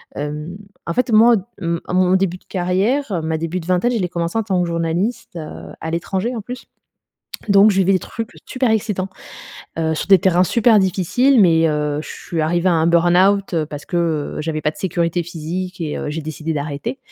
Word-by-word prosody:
Hem, 150 +5 -5 0.3
en 170 - -2
fait, 250 +2 0
moi, 230 +2 +6 0.3
hem, 170 0 -1
à - - -4
mon 185 0 +3
début 185 -1 0
de - - -29
carrière, 195 +10 0 0.2
ma 160 0 -1
début 165 +3 -3
de 165 - -9
vingtaine, 185 +7 +1
je 235 - 0
l'ai 180 - -1
commencé 170 +4 -2
en 225 - +1
tant 185 -3 0
que 175 - 0
journaliste, 170 +8 -2
heu, 160 -2 -8
à 160 - -4
l'étranger, 190 +8 -2
en 225 - -4
plus. 250 +4 -8 0.8
Donc, 200 +1 +6
je 195 - -1
vivais 195 +1 +3
des 185 - +3
trucs 225 +4 -6 0.2
super 255 -2 0
excitants. 210 -3 -1 0.7
Heu, 160 -1 0
sur - - -3
des 195 -2 +7
terrains 180 +1 +3
super 225 +1 +4
difficiles, 200 +8 +2
mais, 165 -3 +5
heu, 150 -1 -1
je - - -11
suis 165 -2 -5
arrivée 175 +3 +1
à - - +3
un 160 0 +2
burn-out 180 +3 +3 0.2
parce 145 -1 -7
que, 175 - -3 0.4
heu, - - -3
j'avais 155 -1 -2
pas 150 - 0
de - - -17
sécurité 170 -1 -1
physique 175 +3 -5
et 155 -2 -3
heu, - - -4
j'ai 160 +2 -3
décidé 155 +1 -4
d'arrêter. 150 - -4
180 Hz, 210 wpm, -19 LUFS, 165-200 Hz, 0.8 s, des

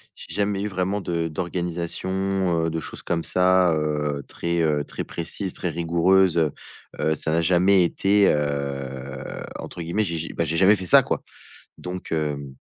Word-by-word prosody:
j'ai - - -10
jamais 100 -1 0
eu 105 - -1
vraiment 95 +1 -1
de 85 -4 -2
d'organisation, 90 +1 -1
heu, 80 - 0
de 80 - -2
choses - - -8
comme 85 -1 -1
ça, 90 -1 +3
heu, 75 -2 -1
très, 85 0 -2
heu, 75 -2 +1
très - - -6
précises, 90 +3 -4
très 90 - -3
rigoureuses, 85 +2 +3
heu. 80 -3 +3 0.5
Heu, 80 0 +1
ça 80 +1 -2
a - - +3
jamais 90 +2 +4
été 100 +3 +3
heu 70 -2 -3 0.2
entre - - -7
guillemets, 85 +6 0
j'ai 85 -4 -2
j'ai 80 - -4
bah, - - 0
j'ai 80 +1 -1
jamais 95 +4 +6
fait 95 -2 -6
ça - - +8
quoi! - - -2 0.6
Donc, 90 0 -7
hem 75 -4 -2
85 Hz, 175 wpm, -24 LUFS, 75-95 Hz, 0.6 s, ça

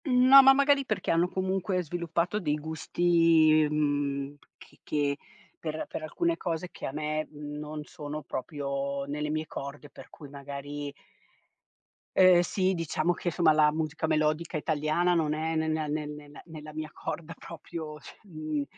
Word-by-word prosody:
No, 260 0 +8
ma 270 0 +8
magari 280 0 +3
perché 215 -5 -1
hanno 170 +2 +3
comunque 185 0 -1
sviluppato 170 +4 -1
dei 150 -6 0
gusti, 160 0 +3
mhmm, 145 -2 -1 0.2
che - - -18
che 145 -1 0 0.4
per 155 -1 -4
per - - -6
alcune 335 - -1
cose 170 0 -3
che - - -6
a - - -4
me 155 +1 -2
non 150 0 -6
sono 150 -1 -7
proprio 140 -1 -3
nelle 150 +1 -3
mie 155 +1 -1
corde, 145 0 -8
per - - -13
cui 145 - -12
magari 140 +1 -6 1.3
Eh 185 -2 +7
sì, 190 0 +1
diciamo 165 0 0
che, 175 - -2
insomma 165 -2 +4
la 150 0 +5
musica 155 0 -2
melodica 155 +1 0
italiana, 155 +3 +1
non 160 -3 +1
è 160 +1 -2
ne 160 0 0
nea 155 -1 -1
ne 150 +1 -2
ne 150 -1 -10
nella 155 -2 -10
mia 155 0 -5
corda 165 +1 -6
proprio 160 -2 -8
cioè, - - -13
mhmm 155 -6 -3
155 Hz, 155 wpm, -28 LUFS, 150-170 Hz, 1.3 s, No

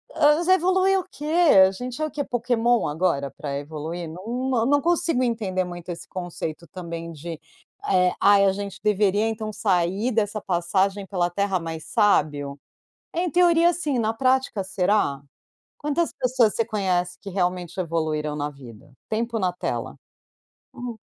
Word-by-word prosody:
Ah, 295 0 +5
mas 345 - -2
vai 370 - +7
evoluir 375 +1 +3
o - - -5
quê? 295 - -8 0.4
A - - -2
gente 250 +7 -6
é - - +2
o 310 - -5
quê, 290 -2 -2
Pokémon, 240 -1 +1
agora, 150 -3 0
para 140 -2 -4
evoluir? 160 +4 -5
Nã 160 - -8
não, 250 +2 -1
eu 225 - +1
não 285 +1 +4
consigo 335 -5 +1
entender 210 -6 -1
muito 175 -1 -8
esse 170 - -6
conceito 175 -2 -6
também 170 0 -7
de: 165 +1 -7 0.5
"Eh, 180 -1 +3
ai, 200 -1 +6
a 195 - +4
gente 200 0 -6
deveria, 210 0 +2
então, 220 -1 -3
sair 200 +2 +1
dessa 215 -1 0
passagem 190 +2 0
pela 180 -3 0
Terra 195 0 0
mais 165 -1 -6
sábio." 145 - +1 0.5
Em 350 +1 0
teoria, 345 0 +4
sim, 295 -7 -1
na 220 0 0
prática, 255 -3 +1
será? 185 -6 +1 0.6
Quantas 300 +3 -1
pessoas 245 -4 +2
você 230 - +1
conhece 185 -5 -1
que 200 - -7
realmente 180 -2 -2
evoluíram 155 -3 -1
na 145 0 -2
vida? 135 -1 -14 0.2
Tempo 230 +1 -1
na 185 -2 0
tela. 180 - -4 0.9
Hum. 245 -2 -5
200 Hz, 165 wpm, -24 LUFS, 170-245 Hz, 0.9 s, vai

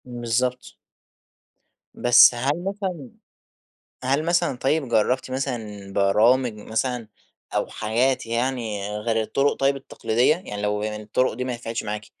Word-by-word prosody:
بالضبط. 125 +1 -2 1.2
بس 120 0 +7
هل 140 +8 -1
مثلًا 190 - -4 0.9
هل 140 +4 +1
مثلًا 170 -4 +1
طيب، 135 +2 0
جربتِ 125 +3 +1
مثلًا 110 -7 -4
برامج 110 +6 +3
مثلًا؟ 110 +2 -3 0.5
أو - - +1
حاجات 120 +5 0
يعني 115 -4 -2
غير 110 +1 0
الطرق 140 +6 +1
طيب 135 0 +1
التقليدية؟ 130 +1 +1
يعني 105 - -7
لو 105 0 -1
الطرق 110 +4 -1
دي 125 +3 -3
ما 130 - -2
نفعتش 115 -1 -4
معاكِ، 105 0 -4
120 Hz, 125 wpm, -23 LUFS, 110-135 Hz, 1.2 s, بس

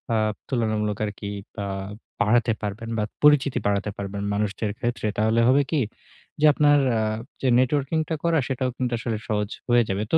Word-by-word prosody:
Up 110 -1 +1
তুলনামূলক 110 -4 0
আরকি 105 0 -6 0.3
বা 100 -2 -4 0.6
বাড়াতে 115 +1 +3
পারবেন 105 +2 -4
বা 105 - +1 0.2
পরিচিতি 140 -3 +5
বাড়াতে 100 0 0
পারবেন 100 0 -4
মানুষদের 105 0 -1
ক্ষেত্রে। 120 -4 -2
তাহলে 110 +2 +2
হবে 140 +2 +5
কী, 155 - +2 0.6
যে 155 - +4
আপনার 145 0 +5 0.2
আ - - +1 0.4
যে 135 - +1
নেটওয়র্কিং 140 +4 +1
টা 160 - 0
করা 170 -1 +3
সেটাও 130 -1 -1
কিন্তু 125 -1 -1
আসলে 115 -2 -2
সহজ 105 -1 0 0.2
হয়ে 120 0 +5
যাবে। 100 +2 -1
তো - - +7
115 Hz, 170 wpm, -24 LUFS, 105-130 Hz, 0.6 s, তো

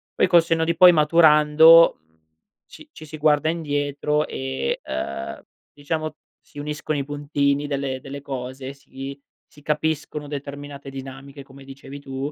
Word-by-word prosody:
Poi - - +3
col 170 -2 +5
senno 165 -1 0
di 170 +1 0
poi 180 +1 +8
maturando, 160 0 +6
mhmm, 80 0 -37 0.5
ci - - -15
ci 155 - -12
si 155 - -10
guarda 150 0 +2
indietro 150 -2 -1
e, 65 0 -3
uhm, 70 +1 -5 0.3
diciamo, 155 +1 -4 0.2
si 145 - -14
uniscono 150 0 -3
i - - -2
puntini 145 0 -1
delle 140 -2 -3
delle 140 +1 -9
cose, 130 0 -6
si 135 0 -10 0.3
si 145 - -20
capiscono 150 -1 -2
determinate 140 -1 -8
dinamiche, 135 +1 -10
come 135 0 -15
dicevi 135 +1 -11
tu. 135 +1 -5
145 Hz, 145 wpm, -22 LUFS, 135-150 Hz, 0.5 s, poi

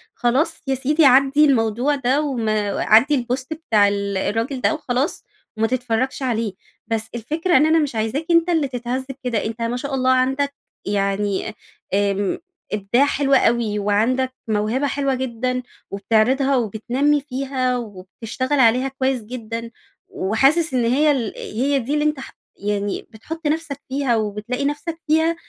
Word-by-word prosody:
خلاص 270 +7 0
يا 270 - +1
سيدي 295 +4 +2
عدي 275 +3 +5
الموضوع 245 +1 +2
ده، 270 +1 +1
وما 220 -8 -1
عدي 255 +5 +4
الpost 260 +1 -1
بتاع 225 -10 +2
ال 200 -1 -1
الراجل 230 +7 -2
ده - - +2
وخلاص 270 -2 -2 0.3
وما 225 +1 +2
تتفرجش 250 +2 -1
عليه. 230 -5 -1 0.3
بس 225 -1 -2
الفكرة 310 - +1
إن 290 - +5
أنا 320 +1 +4
مش 290 -6 -1
عايزاك 225 +8 -1
أنتَ 335 +1 +4
اللي 320 -5 +2
تتهز 250 +1 -3 0.2
كده. 235 -4 -1
أنتَ 225 +1 -5
ما 230 +1 -1
شاء 280 +2 -5
الله 260 0 +2
عندك 270 +2 +1 0.3
يعني 200 0 0 0.4
أ 200 0 +2
آمم 195 0 -1 0.4
إبداع 210 +6 +2
حلو 280 -1 0
أوي، 230 -5 +2
وعندك 230 +6 +1
موهبة 220 +6 0
حلوة 275 -1 0
جدًا، 255 0 -2 0.3
وبتعرضها 230 +7 +2
وبتنمي 250 +6 +1
فيها، 260 -2 -2
وبتشتغل 230 +5 -4
عليها 250 +2 +4
كويس 265 -2 -1
جدًا، 230 0 -6 0.4
وحاسس 270 - +2
إن 245 -2 +2
هي 290 +6 +3
ال 240 -7 -1
هي 270 +6 -1
دي 265 +3 -3
اللي 300 0 +1
أنتَ 300 -2 0
ح 270 - -9 0.2
يعني 205 0 -3
بتحط 310 +9 -6
نفسك 300 -2 -2
فيها 265 -2 +1
وبتلاقي 220 +5 -2
نفسك 315 +3 -3
فيها. 320 +2 +3
255 Hz, 155 wpm, -21 LUFS, 220-280 Hz, 0.4 s, عدي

